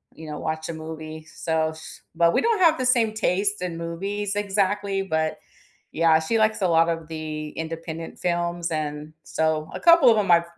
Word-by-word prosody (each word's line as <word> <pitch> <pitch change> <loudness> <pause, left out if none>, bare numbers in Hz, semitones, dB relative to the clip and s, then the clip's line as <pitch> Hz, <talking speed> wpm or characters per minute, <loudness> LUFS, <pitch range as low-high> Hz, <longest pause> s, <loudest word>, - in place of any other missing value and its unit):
you 155 -1 -10
know, 150 - -5
watch 160 +1 -3
a - - -3
movie, 155 0 -8
so, 160 -1 0
if 160 - -9
s 160 - -11
but 170 0 +4
we - - +3
don't 455 -3 +1
have 325 -3 +5
the 255 - -1
same 230 -4 +3
taste 200 -1 0
in 175 -2 -3
movies 195 +5 -3
exactly, 200 -1 0
but, 160 -3 -1 0.6
yeah, 160 -1 +4
she 160 +8 -1
likes 215 -1 +2
a 185 - +2
lot 165 0 +4
of 165 -1 -4
the 155 -1 -5
independent 165 0 -6
films, 175 -1 -1
and, 150 0 -4
so, 160 -1 -1
a - - -5
couple 335 -7 +7
of 220 - +4
'em 195 -4 0
I've 170 0 +6
170 Hz, 200 wpm, -24 LUFS, 160-200 Hz, 0.6 s, couple